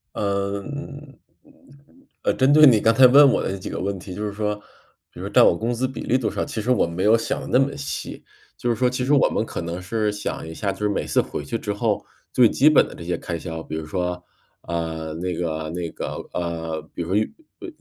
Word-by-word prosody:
呃， 100 Hz, 0 st, -1 dB
嗯， 145 Hz, +1 st, -8 dB, 0.3 s
嗯， -, -, -21 dB, 0.7 s
呃， -, -, +2 dB
针 135 Hz, +2 st, +3 dB
对 155 Hz, 0 st, +8 dB
你 115 Hz, -6 st, +7 dB
刚 115 Hz, +2 st, +4 dB
才 130 Hz, +1 st, +8 dB
问 140 Hz, +2 st, +8 dB
我 -, -, +1 dB
的 -, -, -2 dB
那 95 Hz, -, -4 dB
几 95 Hz, -, -7 dB
个 -, -, -4 dB
问 100 Hz, +1 st, -2 dB
题， 90 Hz, +1 st, -8 dB
就 105 Hz, +1 st, -3 dB
是 105 Hz, -, -4 dB
说 105 Hz, 0 st, -1 dB, 0.6 s
比 -, -, -13 dB
如 -, -, -5 dB
占 -, -, +6 dB
我 -, -, +5 dB
工 115 Hz, +6 st, -2 dB
资 130 Hz, +2 st, -1 dB
比 130 Hz, -, -7 dB
例 130 Hz, -, +1 dB
多 125 Hz, -, -1 dB
少， -, -, -2 dB
其 110 Hz, -, -4 dB
实 125 Hz, +4 st, 0 dB
我 125 Hz, -, +3 dB
没 85 Hz, +3 st, -3 dB
有 110 Hz, +2 st, +5 dB
想 115 Hz, -, -2 dB
得 -, -, -7 dB
那 125 Hz, -, +3 dB
么 140 Hz, 0 st, -6 dB
细。 140 Hz, -1 st, -6 dB, 0.3 s
就 120 Hz, -, 0 dB
是 -, -, +1 dB
说 125 Hz, +2 st, +2 dB
其 125 Hz, 0 st, -2 dB
实 145 Hz, -, +2 dB
我 140 Hz, -, +5 dB
们 -, -, -1 dB
可 -, -, -5 dB
能 85 Hz, +2 st, -4 dB
是 105 Hz, +2 st, -1 dB
想 105 Hz, -5 st, -5 dB
一 -, -, -7 dB
下 100 Hz, +4 st, -2 dB
就 -, -, -10 dB
是 105 Hz, 0 st, 0 dB
每 100 Hz, -, -1 dB
次 -, -, +2 dB
回 75 Hz, -, -6 dB
去 115 Hz, +9 st, -3 dB
之 105 Hz, -, -3 dB
后， 105 Hz, -1 st, -1 dB, 0.3 s
最 120 Hz, -3 st, +6 dB
基 150 Hz, +4 st, +5 dB
本 155 Hz, -, +5 dB
的 -, -, -11 dB
这 85 Hz, -, -9 dB
些 90 Hz, +1 st, -1 dB
开 85 Hz, -2 st, -4 dB
销， 80 Hz, -1 st, -6 dB
比 80 Hz, -, -6 dB
如 80 Hz, -1 st, -4 dB
说， 90 Hz, +1 st, -3 dB, 0.4 s
呃， 80 Hz, -2 st, -4 dB
那 90 Hz, +2 st, -3 dB
个 80 Hz, -2 st, -3 dB
那 85 Hz, -1 st, -3 dB
个 -, -, -6 dB
呃， 80 Hz, -2 st, -3 dB
比 85 Hz, -, -3 dB
如 85 Hz, -, -7 dB
说 -, -, +2 dB
运 110 Hz, -, +1 dB, 0.3 s
呃 365 Hz, -, -7 dB
105 Hz, 280 characters per minute, -23 LUFS, 85-125 Hz, 0.7 s, 对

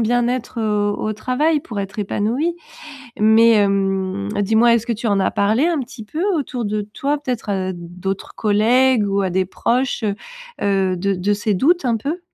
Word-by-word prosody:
bien-être, 245 Hz, +1 st, 0 dB
heu, 210 Hz, -1 st, +1 dB
au 215 Hz, -, -2 dB
travail 285 Hz, +8 st, 0 dB
pour 235 Hz, -9 st, -7 dB
être 195 Hz, -1 st, -5 dB
épanouie. 240 Hz, -, -1 dB, 0.6 s
Mais 220 Hz, +2 st, +6 dB
hem, 195 Hz, -1 st, 0 dB
dis-moi 225 Hz, +3 st, +4 dB
est-ce 230 Hz, -1 st, -1 dB
que 235 Hz, -, -1 dB
tu 225 Hz, +2 st, -4 dB
en 200 Hz, -2 st, +2 dB
as 190 Hz, -, +1 dB
parlé 215 Hz, +8 st, +2 dB
un 335 Hz, -3 st, +1 dB
petit 245 Hz, -2 st, -7 dB
peu 305 Hz, +10 st, -5 dB
autour 255 Hz, -5 st, -3 dB
de 210 Hz, 0 st, -1 dB
toi, 275 Hz, +8 st, -2 dB
peut-être 250 Hz, -6 st, -4 dB
à 190 Hz, -1 st, -1 dB
d'autres 180 Hz, +3 st, -6 dB
collègues 225 Hz, +2 st, +3 dB
ou 200 Hz, 0 st, +1 dB
à 190 Hz, -, 0 dB
des 190 Hz, +1 st, +1 dB
proches, 245 Hz, +6 st, -1 dB
heu 205 Hz, -2 st, +1 dB, 0.5 s
heu, 195 Hz, -2 st, +1 dB
de 195 Hz, +3 st, 0 dB
de 190 Hz, +3 st, 0 dB
ces 205 Hz, 0 st, -1 dB
doutes, 335 Hz, -, +2 dB
un 235 Hz, -2 st, +1 dB
peu? 295 Hz, -, -3 dB
215 Hz, 185 wpm, -20 LUFS, 200-250 Hz, 0.6 s, Mais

